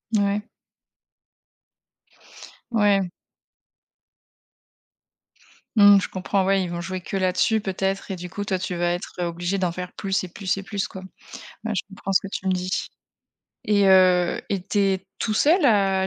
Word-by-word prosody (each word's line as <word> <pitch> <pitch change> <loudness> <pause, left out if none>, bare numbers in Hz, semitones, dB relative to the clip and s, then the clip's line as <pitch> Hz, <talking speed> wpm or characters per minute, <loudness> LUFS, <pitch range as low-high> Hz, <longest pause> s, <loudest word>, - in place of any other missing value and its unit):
Ouais. 205 +1 0 2.2
Ouais. 205 -4 +3 2.7
Mmh, 205 -2 +8
je - - -4
comprends, 190 +1 -1
ouais, 195 0 +2
ils 180 - -4
vont 170 0 -4
jouer 185 +1 -5
que 195 - -4
là-dessus 185 +4 +1
peut-être 195 0 -2
et 190 - -2
du 180 0 -8
coup, 205 +3 -5
toi, 190 -2 0
tu 180 0 -4
vas 175 0 0
être, 175 - -6
heu, 175 - 0
obligé 175 +3 -2
d'en 180 -2 0
faire 180 +1 -6
plus 195 -1 -1
et - - -5
plus 190 +2 -2
et 195 - -5
plus, 200 0 -3
quoi, 190 - -9 0.6
bah, 220 0 -3
je 185 - -1
comprends 195 0 -5
ce 190 - +5
que - - -6
tu 190 - -5
me - - +3
dis 185 0 -2 0.9
et 205 -2 +3
heu, 185 -2 +4
et 195 -2 -2
tu 205 - -2
es 195 -1 +1
tout 215 - -1
seul 315 - +4
à 195 -4 +3
190 Hz, 170 wpm, -23 LUFS, 185-200 Hz, 2.7 s, Mmh